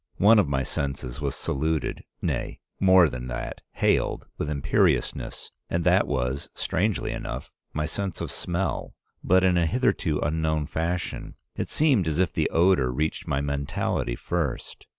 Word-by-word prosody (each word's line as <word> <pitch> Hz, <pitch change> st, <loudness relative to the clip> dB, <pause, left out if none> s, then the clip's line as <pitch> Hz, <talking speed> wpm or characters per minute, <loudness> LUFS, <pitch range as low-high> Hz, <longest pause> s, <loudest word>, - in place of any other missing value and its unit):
One 105 Hz, +3 st, +6 dB
of 90 Hz, -8 st, +2 dB
my 65 Hz, -1 st, +1 dB
senses 70 Hz, 0 st, -3 dB
was 70 Hz, -1 st, -1 dB
saluted, 80 Hz, +2 st, -1 dB, 0.2 s
nay, -, -, -2 dB, 0.2 s
more 95 Hz, -3 st, +7 dB
than 60 Hz, -3 st, -5 dB
that, -, -, -5 dB
hailed, -, -, +1 dB
with 75 Hz, -, -3 dB
imperiousness, 70 Hz, -2 st, 0 dB, 0.2 s
and 85 Hz, 0 st, 0 dB
that 90 Hz, +3 st, +4 dB
was, 65 Hz, 0 st, -2 dB
strangely 100 Hz, +4 st, 0 dB
enough, 65 Hz, +2 st, -5 dB, 0.2 s
my 75 Hz, 0 st, -1 dB
sense 95 Hz, +4 st, -3 dB
of -, -, -3 dB
smell, 90 Hz, +2 st, -2 dB, 0.3 s
but 95 Hz, +1 st, +4 dB
in 90 Hz, -1 st, +4 dB
a 85 Hz, -, +2 dB
hitherto 90 Hz, -, +1 dB
unknown 80 Hz, 0 st, 0 dB
fashion. 85 Hz, +4 st, -3 dB, 0.2 s
It -, -, -3 dB
seemed 135 Hz, -, +3 dB
as 75 Hz, -1 st, 0 dB
if 90 Hz, -2 st, +2 dB
the -, -, +1 dB
odor 85 Hz, -7 st, +3 dB
reached 75 Hz, +5 st, -2 dB
my 70 Hz, -, 0 dB
mentality 70 Hz, -4 st, -1 dB
first. 80 Hz, -4 st, -3 dB
80 Hz, 150 wpm, -26 LUFS, 70-90 Hz, 0.3 s, more